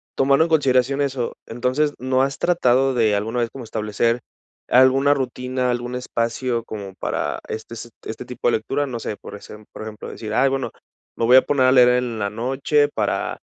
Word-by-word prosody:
tomando 140 +3 +4
en - - -5
consideración 135 -3 +2
eso, 130 -4 -2
entonces, 130 +6 0
¿no 130 +1 +1
has 135 +1 0
tratado 135 -6 +2
de 110 -4 +2
alguna 110 +4 -2
vez 120 -1 0
como 135 - -8
establecer 110 +2 -1 0.5
alguna 130 +3 +5
rutina, 125 -1 -2
algún 120 0 -3
espacio 120 -1 -2
como 100 -4 -7
para 75 -5 -3
este, 110 +1 -6
se 115 +1 -8 0.2
este 110 - -6
tipo 125 - -3
de - - +2
lectura?, 140 +6 -2
no 125 -4 -5
sé, 110 - -4
por - - -10
esem 105 +1 -12
por - - -10
ejemplo 110 -1 -8
decir: 110 -1 -6
"Ay, 135 +4 +3
bueno, 135 -1 -2 0.4
me 115 - 0
voy 125 +3 +7
a - - +8
poner 135 -2 +1
a 130 - +5
leer 125 -2 +7
en 125 -2 0
la 100 -1 -1
noche 135 +6 +1
para - - -1
125 Hz, 195 wpm, -21 LUFS, 115-135 Hz, 0.5 s, a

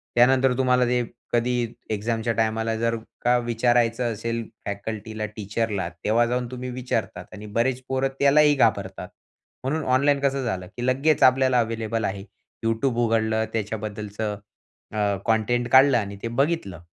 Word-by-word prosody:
त्यानंतर 130 +1 +5
तुम्हाला 125 -1 +3
ते 125 0 +1 0.3
कधी 120 -1 0 0.2
एक्झामच्या 110 +2 -1
टायमाला, 110 0 0
जर 115 +1 0 0.3
का 125 +1 +3
विचारायचं 120 0 +1
असेल 115 +2 -3 0.2
फॅकल्टीला, 110 +1 -4
टीचरला 105 -2 -3
तेव्हा 115 +3 +3
जाऊन 125 +1 -1
तुम्ही 125 0 -5
विचारतात 120 -5 -3
आणि 105 0 -9
बरेच 125 +2 +1
पोरं 135 0 +1
त्यालाही 145 +1 +5
घाबरतात. 100 -7 0 0.5
म्हणून 150 +4 -1
ऑनलाईन 140 +2 +3
कसं 140 -1 0
झालं 95 -7 -3
की 120 - -2
लगेच 135 +4 +2
आपल्याला 130 0 +5
अवेलेबल 115 -1 -1
आहे.Youtube 115 +5 -3
उघडलं, 110 -1 +1
त्याच्याबद्दलचं 105 -1 -4 0.6
अ, - - -4 0.3
कंटेंट 120 +2 +1
काढलं 130 -1 +7
आणि 100 -3 -3
ते - - -3
बघितलं. 120 - -1
115 Hz, 135 wpm, -24 LUFS, 110-125 Hz, 0.6 s, काढलं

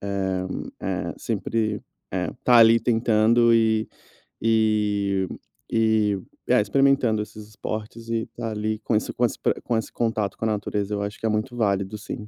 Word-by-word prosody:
eh 95 -1 -1 0.6
eh, - - -5
sempre, 110 -2 -2 0.3
eh, - - -1
estar 125 -1 +5
ali 115 0 +7
tentando 115 0 +3
e 110 -1 +3 0.5
e 105 -3 +1 0.4
e, 110 -3 +2 0.3
eh, - - +4
experimentando 125 -1 +2
esses 105 0 -9
esportes 110 +2 -6
e 115 -1 0
estar 115 -1 -6
ali 110 0 -2
com 110 0 -1
isso, 105 - -1
com 120 - +2
esse - - -2
pro - - +2
com 120 - -1
esse 110 - -3
contato 110 -3 -1
com 115 - -3
a - - +2
natureza 105 -1 -2
eu 100 - -1
acho 100 0 -5
que - - -4
é - - +2
muito 110 +4 -1
válido 100 -2 0
sim. 105 +1 -7
110 Hz, 170 wpm, -24 LUFS, 105-115 Hz, 0.6 s, ali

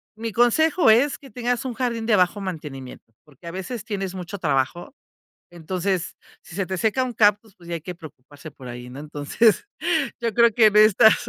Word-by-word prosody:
mi 225 +1 -5
consejo 290 - +3
es 250 +6 +4
que 275 - -14
tengas 245 +2 -2
un 255 - -3
jardín 235 -2 -2
de 220 -2 +3
bajo 185 +1 +2
mantenimiento, 145 -10 -8
porque 150 +3 -16
a - - -5
veces 200 +5 -6
tienes 195 -3 -4
mucho 185 +2 -6
trabajo, 145 - -1 0.6
entonces, 180 +1 -3 0.3
si 165 - -12
se 195 - 0
te 190 0 -4
seca 225 +7 +1
un 250 - -4
cactus, 210 -1 +2
pues 170 -1 -17
ya 170 - -3
hay 165 - -5
que 180 +2 -7
preocuparse 145 -2 -13
por 130 -4 -12
ahí, 120 0 -8
¿no? 130 +3 -9
Entonces, 150 - +1 0.5
yo 235 -2 -2
creo 235 +2 +5
que 225 -3 +6
en 210 -1 +3
estas, 215 +1 +5
195 Hz, 195 wpm, -23 LUFS, 165-230 Hz, 0.6 s, que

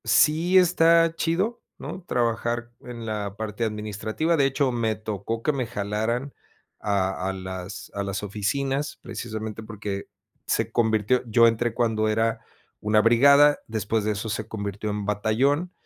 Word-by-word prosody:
Sí 165 +5 +4
está 165 -2 +5
chido, 185 +9 -1 0.2
¿no? 190 - -7
Trabajar, 120 -4 -1
en 120 -2 -8
la 105 -2 -3
parte 110 +1 -4
administrativa. 110 - -1
De 140 -3 +3
hecho, 135 -1 +1
me 115 -2 0
tocó 110 +1 -4
que 150 - +2
me 130 -4 -2
jalaran, 110 +5 -2 0.5
a 95 -2 -1
a - - -2
las 95 +1 -7
a 100 - -3
las 100 0 -3
oficinas, 135 +8 -2
precisamente, 110 -1 -6
porque, 105 -2 -5 0.4
se - - 0
convirtió 110 +1 +2
yo 115 +1 +6
entré, 115 0 0
cuando 110 -2 +1
era 115 +1 0 0.4
una 105 0 +2
brigada, 140 +6 +6
después 110 0 -1
de 105 - 0
eso, 105 +2 -4
se 110 +1 -3
convirtió 100 -1 -4
en 105 -1 -3
batallón, 125 - +1
110 Hz, 150 wpm, -25 LUFS, 105-135 Hz, 0.5 s, yo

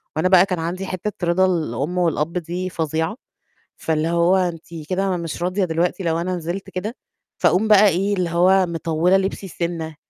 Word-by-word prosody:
وأنا 160 +4 +1
بقى 185 0 +6
كان 180 -3 -3
عندي 180 +4 -3
حتّة 185 -1 -4
رضا 185 +2 +3
الأم 160 -2 -1
والأب 165 -2 0
دي 180 +2 -4
فظيعة، 160 +3 -2 0.6
فاللي 160 0 -1
هو 170 +2 +3
أنتِ 175 -3 -2 0.2
كده 190 0 0
مش 165 -1 -5
راضية 185 +2 0
دلوقتي 175 +3 -1
لو 165 -1 0
أنا 180 +1 -2
نزلت 175 +3 -5
كده، 210 +7 -5 0.4
فأقوم 180 +5 +2
بقى 210 -1 +7
إيه، 195 +2 +1
اللي 180 -3 -1
هو 185 +3 +4
مطوّلة 170 +2 +1
لبسي 195 0 -3
سِنّة، 165 -3 -4
175 Hz, 170 wpm, -21 LUFS, 165-185 Hz, 0.6 s, بقى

